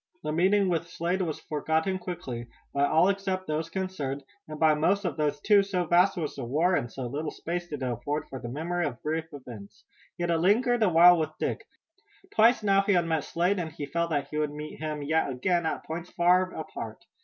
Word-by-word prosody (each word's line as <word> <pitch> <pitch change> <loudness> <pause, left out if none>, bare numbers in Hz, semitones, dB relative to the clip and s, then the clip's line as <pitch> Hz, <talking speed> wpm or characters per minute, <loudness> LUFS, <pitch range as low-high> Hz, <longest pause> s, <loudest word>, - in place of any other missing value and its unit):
The 150 - -2
meeting 190 +5 +3
with 170 -2 0
Slade 180 +2 -1
was 160 -4 -3
forgotten 160 +5 -1
quickly, 130 -10 -6 0.3
by 140 0 +2
all 160 +5 +4
except 195 -1 -1
those 155 +1 -2
concerned, 165 -7 -3 0.2
and 155 0 -7
by 155 -1 +5
most 190 +7 +1
of 165 -6 -1
those 150 -1 0
too, 205 -2 +5
so 190 -3 -1
vast 180 +4 +4
was 155 -4 -2
the 135 - -6
war 155 +10 +1
and 120 -7 -2
so 130 +1 -5
little 145 +5 -3
space 175 +1 -4
did 145 -5 -5
it - - 0
afford 125 +5 -3
for 135 - -7
the 120 - -6
memory 170 +6 -2
of 125 -4 -8
brief 160 +1 -1
events. 120 -8 -11 0.3
Yet 175 0 -1
it 165 - +2
lingered 235 +7 +3
a 215 - +5
while 175 +1 +7
with 155 -1 -3
Dick. - - -3 0.7
Twice 225 +1 +5
now 195 -1 +4
he 200 +1 +1
had 175 -2 +3
met 160 -2 0
Slade 180 +4 0
and 165 -2 -3
he 150 -2 -6
felt 170 +4 -1
that 145 -3 -1
he 150 - -3
would 150 -1 +1
meet 150 0 -8
him 155 -1 -4
yet 160 +1 +1
again 165 +6 0
at - - -3
points 165 +2 -5
far 180 +1 +3
apart. 115 -8 -7
160 Hz, 220 wpm, -28 LUFS, 150-180 Hz, 0.7 s, while